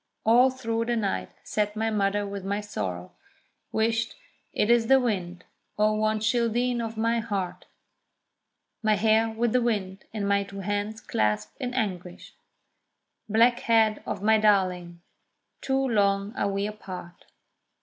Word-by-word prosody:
All 245 +4 +6
through 230 -3 -2
the 240 0 0
night 195 - -1
sat 210 0 -1
my 220 +1 0
mother 205 -1 +1
with 200 -1 -6
my 200 +1 -1
sorrow; 95 - -5 0.6
"Whisht, 225 +1 0 0.4
it 215 - +1
is 235 -1 +4
the 270 +1 +6
wind, 180 -7 -2 0.3
O 215 +1 +3
one 215 0 +1
childeen 235 +2 +1
of 225 -1 -5
my 230 +1 +1
heart!" 200 -5 -4 1.1
My 215 -1 +3
hair 220 +2 +3
with 225 +1 -1
the 250 - +3
wind, 200 -5 -2
and 210 -2 -3
my 200 0 +3
two 195 0 -8
hands 205 +2 -3
clasped 105 - -1
in 250 -1 -4
anguish; 180 -7 -4 1.0
Black 230 +3 +4
head 220 -2 +2
of 200 - -4
my 220 +1 +4
darling! 180 -5 +1 0.6
too 270 0 0
long 200 -2 +1
are 200 - 0
we 200 0 -1
apart. 185 -4 -8
215 Hz, 145 wpm, -26 LUFS, 195-230 Hz, 1.1 s, All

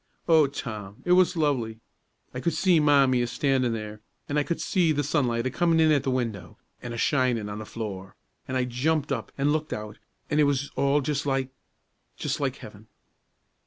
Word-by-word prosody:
O 160 -4 +5
Tom, 110 -7 -7
it 175 - +1
was 180 -1 +4
lovely! 125 -8 0 0.5
I 125 - -4
could 170 +5 -1
see 180 -4 +4
Mommie 140 -4 +4
a 120 - 0
stannin' 130 -1 +1
there, 105 -1 -6 0.3
an' 145 +1 0
I - - +1
could 170 +3 -3
see 175 -4 +2
the 145 -1 0
sunlight 125 -5 0
a 130 - -1
comin' 165 +2 +2
in 160 -1 +5
at 145 -3 +3
the 135 - -2
window, 115 -7 -3 0.2
an' 120 - -6
a 120 - -5
shinin' 125 -4 +1
on 105 +1 -6
the 110 - -8
floor; 95 -4 -6 0.3
an' 130 - -3
I 130 - +2
jumped 145 +5 0
up - - -3
an' 140 +1 +2
looked 155 0 -1
out, 105 0 -7 0.3
an' 150 - +2
it 150 - +5
was 140 0 -1
all 140 +1 +2
just 145 +1 -2
like 135 -1 0 0.7
just - - -2
like - - -1
heaven." - - -13
135 Hz, 200 wpm, -26 LUFS, 115-150 Hz, 0.7 s, O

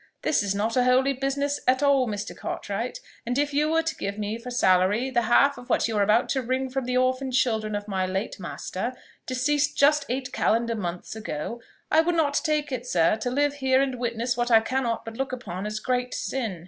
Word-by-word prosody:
This 300 - +2
is 200 -1 -1
not 220 +3 -1
a 250 - +4
holy 260 +2 +3
business 280 +2 -1
at 260 +2 +3
all, 275 -3 +4
Mr. 205 -2 -4
Cartwright; - - -4 0.2
and 245 +2 -2
if 290 0 0
you 300 +2 +2
were 325 +1 +2
to 325 - -2
give 200 +1 -4
me 210 +2 -3
for 250 +2 -8
salary 205 +2 +2
the 240 -1 +2
half 260 +5 +3
of 245 - -13
what - - +2
you 225 - -3
are 205 - +2
about 215 +4 +3
to 265 - +1
wring 260 +1 -2
from 265 -1 -2
the 250 0 0
orphan 255 +1 +1
children 220 -4 +1
of 205 0 -4
my 190 -2 -1
late 190 +3 -3
master, 190 +5 -4 0.3
(deceased 290 +3 0
just 290 +1 +4
eight 255 +1 -3
calendar 230 +1 +1
months 180 -2 -5
ago,) 220 +2 -5 0.3
I 315 - +6
would 345 +1 0
not 290 -3 +2
take 300 -3 0
it, 250 -1 -4
sir, 170 -2 +3
to 225 +3 -2
live 285 +3 +1
here 260 0 +3
and 265 -2 0
witness 235 0 -1
what 240 0 -1
I 225 -2 +7
cannot 235 0 -2
but 225 0 -8
look 270 0 -2
upon 205 -6 -5
as 215 0 -3
great 250 0 -1
sin." 225 -9 -3
250 Hz, 225 wpm, -25 LUFS, 220-270 Hz, 0.3 s, I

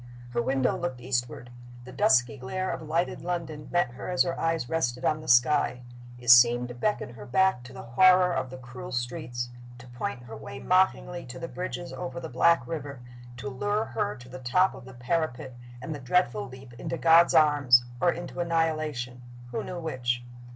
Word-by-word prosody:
Her 120 -1 0
window 130 +1 +1
looked 175 -9 -4
eastward. 125 -1 -3 0.3
The 125 - -10
dusky 125 +1 +3
glare 165 +9 -3
of - - -5
lighted 160 +3 -1
London 165 -4 -4
met 175 -8 +1
her 125 - -7
as 180 - +3
her 170 -1 -2
eyes 165 -5 0
rested 125 -6 -1
on 155 0 +1
the 155 - -11
sky. 125 0 +3 0.3
It 120 -1 +3
seemed 120 0 +6
to - - -6
beckon 120 - -2
her 110 -3 -10
back 190 +1 +2
to 130 - -11
the 130 - -9
horror 180 +9 +5
of 130 - -2
the 130 - -8
cruel 125 0 -9
streets 120 0 -4 0.3
to 125 - -13
point 120 0 -5
her 115 -2 -9
way 110 +4 -9
mockingly 180 +1 +1
to 125 +1 -8
the 165 - -5
bridges 175 0 -5
over 175 -1 -5
the 165 -2 -7
black 130 +2 +3
river 145 -2 -6 0.4
to 135 - -6
lure 205 +11 -1
her 115 -4 -2
to 125 +2 -13
the 130 +1 -9
top 155 +10 +2
of - - -12
the 130 -1 -12
parapet, 130 -1 -2 0.3
and 160 - -4
the 145 - -7
dreadful 125 - +1
leap 130 -1 -12
into 165 +1 -4
God's 165 +1 +5
arms, 140 -5 +5 0.2
or 175 - +4
into 175 +1 -7
annihilation 155 -7 -1 0.3
who 120 - -3
knew 180 - -6
which? 125 -7 -2
130 Hz, 195 wpm, -27 LUFS, 125-170 Hz, 0.4 s, seemed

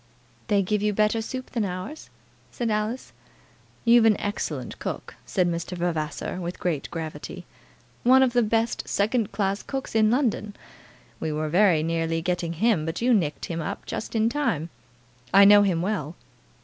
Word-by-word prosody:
"They 205 -3 +3
give 210 +2 0
you 210 0 +1
better 215 +2 +2
soup 255 +3 -6
than 230 -3 -1
ours?" 185 +11 -6 0.4
said 235 -2 -2
Alice. 215 +4 -2 0.7
"You've 235 -1 +6
an 220 -2 +4
excellent 205 +1 -4
cook," - - -5
said 180 -3 +1
Mr. 170 +1 -3
Vavasor, 165 -1 -2
with 175 +1 -5
great 165 -6 -2
gravity; 160 -2 -6 0.6
"one 260 +2 +6
of 250 -2 +1
the 245 - +4
best 225 +1 0
second 215 +1 0
class 200 -1 -1
cooks 270 -1 -5
in 220 -1 +4
London. 225 -5 0 0.6
We 160 - -2
were 155 0 -2
very 175 -2 +4
nearly 165 0 0
getting 175 -1 -1
him, 195 -1 +2
but 165 +2 -3
you 250 0 +4
nicked 160 -9 0
him 165 -1 -4 0.2
just 220 - -5
in 220 0 +3
time. 230 - -1 0.6
I 200 0 +9
know 205 +1 +8
him 180 -4 +1
well." 180 -6 -2
205 Hz, 160 wpm, -25 LUFS, 170-225 Hz, 0.7 s, I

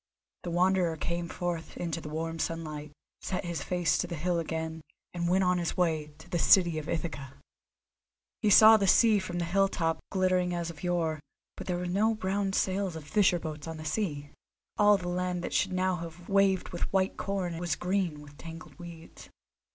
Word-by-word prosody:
The 175 - -5
Wanderer 175 -1 +2
came 170 +2 -3
forth 175 -3 -4
into 165 -1 -3
the 150 - -7
warm 165 +1 -4
sunlight, 155 -3 -4 0.3
set 185 0 -3
his 170 -1 -3
face 175 -3 0
to 180 - -1
the 170 - -5
hill 170 +2 0
again, 160 0 -4 0.3
and 170 -1 -1
went 190 +2 +3
on 180 0 +2
his 170 - -2
way 160 -4 +1
to 160 - -15
the 175 - -2
city 170 -2 +5
of 155 - -8
Ithaca. 145 -5 -4 1.1
He 215 - +3
saw 220 +2 +9
the 200 -2 0
sea 220 +1 +5
from 185 -2 -5
the 175 - -1
hill 195 +3 +3
top 165 -4 -1
glittering 185 -2 +1
as 170 -1 -3
of 150 - -14
yore, 170 -3 0 0.4
but - - -8
there 180 -1 -1
were 180 - -3
no 210 +5 +1
brown 195 -1 -1
sails 190 -2 0
of 160 - -7
fisher 185 +2 +3
boats 155 -2 -6
on 160 0 -5
the 155 - -8
sea. 155 -5 -2 0.4
All 205 0 +5
the 180 -2 -6
land 180 0 -2
that - - -4
should 190 - +1
now 185 0 0
have 170 +1 -9
waved 195 -1 +2
with 175 - -7
the - - 0
white 190 0 0
corn 185 -4 -3
was 175 -1 -1
green 180 -5 -1
with 145 0 -15
tangled 165 +1 -10
weeds. 170 -2 -11
175 Hz, 200 wpm, -29 LUFS, 165-185 Hz, 1.1 s, saw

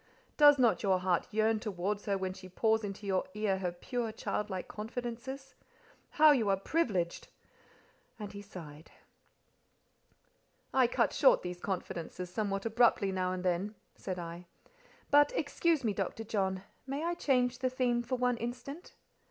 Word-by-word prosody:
Does 290 -1 +8
not 245 -4 +3
your 195 -3 +3
heart 180 -2 +1
yearn 220 +1 +2
towards 205 0 -3
her 200 -1 +1
when 190 -1 -3
she 185 0 -11
pours 220 +4 +1
into 205 0 -6
your 190 -2 +1
ear 205 -3 0
her 180 -2 -1
pure, 230 +6 -3
childlike 205 -3 -3
confidences? 245 +4 -6 0.6
How 310 0 +8
you 235 -8 +2
are 195 - +3
privileged!" 195 - -1 0.9
And 210 -3 -6
he 200 - -7
sighed. 165 -6 -11 1.8
"I 260 -2 +5
cut - - +1
short - - +5
these 180 0 -5
confidences 180 -1 -4
somewhat 195 0 -2
abruptly 225 -3 +3
now 185 -1 -1
and 185 0 -4
then," 185 +4 0 0.2
said 185 -2 -5
I. 170 0 -7 0.6
"But 290 +8 +6
excuse 330 - +1
me, 215 -3 +1
Dr. 200 +3 -3
John, 190 -3 -1 0.2
may 280 +3 -3
I 340 +1 0
change 250 -6 +1
the 255 0 +1
theme 250 -2 +1
for 250 +2 -2
one 250 -1 +1
instant? 250 +8 -6
210 Hz, 150 wpm, -32 LUFS, 190-245 Hz, 1.8 s, Does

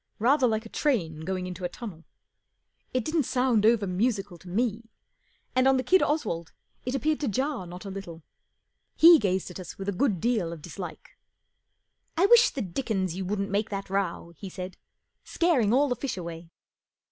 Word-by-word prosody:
Rather 260 +4 +4
like 220 0 -1
a - - -9
train 180 - 0
going 185 +3 -3
into 180 0 -7
a 175 - -1
tunnel. 175 -5 -9 0.9
It 255 -3 -1
didn't 315 0 +1
sound 250 -5 +2
over 225 -3 +4
musical 195 -1 -1
to 180 - -12
me, 225 +3 -1 0.7
and 255 +1 +4
on 270 0 +5
the 255 - 0
kid 370 +9 +4
Oswald 205 - -1 0.3
it 255 - 0
appeared 305 +4 +1
to 290 - -1
jar 260 -2 -1
not 180 +3 -9
a 195 - -5
little. 175 -4 -8 0.7
He 330 0 +9
gazed 190 -4 -1
at 180 - -8
us 180 - -8
with 195 - -6
a - - +2
good 200 -1 +1
deal 220 -7 0
of 165 -3 -9
dislike. 185 - -9 0.5
" - - -46
I 360 - +5
wish 475 +3 +7
the 265 - -4
dickens 190 -2 -2
you 190 0 -3
wouldn't 200 +1 -2
make 205 +2 0
that 195 -1 -5
row," 180 -3 -2
he 195 - -8
said. 185 0 -7 0.5
44 - - -19
Scaring 290 -12 +3
all 275 +4 +4
the 250 - 0
fish 250 -3 -4
away." 170 -1 -7
205 Hz, 195 wpm, -27 LUFS, 180-255 Hz, 0.9 s, He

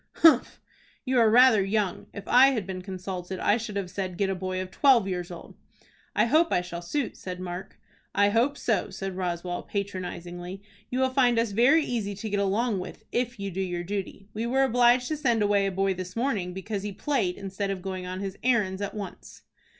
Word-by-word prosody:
"Humph! 310 -7 +5 0.5
You 255 -1 +2
are 225 -2 +6
rather 230 -3 +6
young. 200 -2 -1
If 200 - -9
I 255 +2 +7
had 240 -8 0
been 185 -1 -5
consulted 185 -1 -5
I 210 - +3
should 220 -3 -6
have 195 -3 -3
said 185 -1 -4
'Get 195 0 +1
a - - +1
boy 185 0 -3
of 185 0 -5
twelve 250 -7 +4
years 180 -2 -3
old.'" 175 -2 -10 0.6
"I - - +4
hope 315 +7 +3
I - - +3
shall 175 -1 -6
suit," 250 +9 -2
said 180 -1 -7
Mark. 180 0 -7 0.4
"I 205 0 +4
hope 240 +7 +2
so," 225 - 0
said 190 0 -5
Roswell, 175 -1 -3
patronizingly. 185 -1 -5 0.3
"You 255 +1 -1
will 260 0 +2
find 250 -3 +3
us 230 -2 +1
very 270 +9 +4
easy 210 -5 -2
to 215 +3 -5
get 200 - +1
along 200 +2 +1
with 180 +4 -8
if 240 -2 -1
you 200 0 -3
do 190 +2 -3
your 175 -2 -2
duty. 195 +1 -5
We 225 +2 -2
were 265 +2 +3
obliged 245 0 +4
to 310 - -1
send 240 -7 +2
away 205 -1 +3
a - - -1
boy 195 +1 +1
this 185 0 -7
morning 230 -7 -1
because 195 +2 -4
he 205 +1 -4
played 200 -6 -1
instead 195 0 -4
of 190 -2 -4
going 185 -1 -4
on 185 +1 -5
his 195 -1 -5
errands 210 -6 +1
at 200 - -4
once." 205 -3 -8
200 Hz, 210 wpm, -27 LUFS, 185-235 Hz, 0.6 s, I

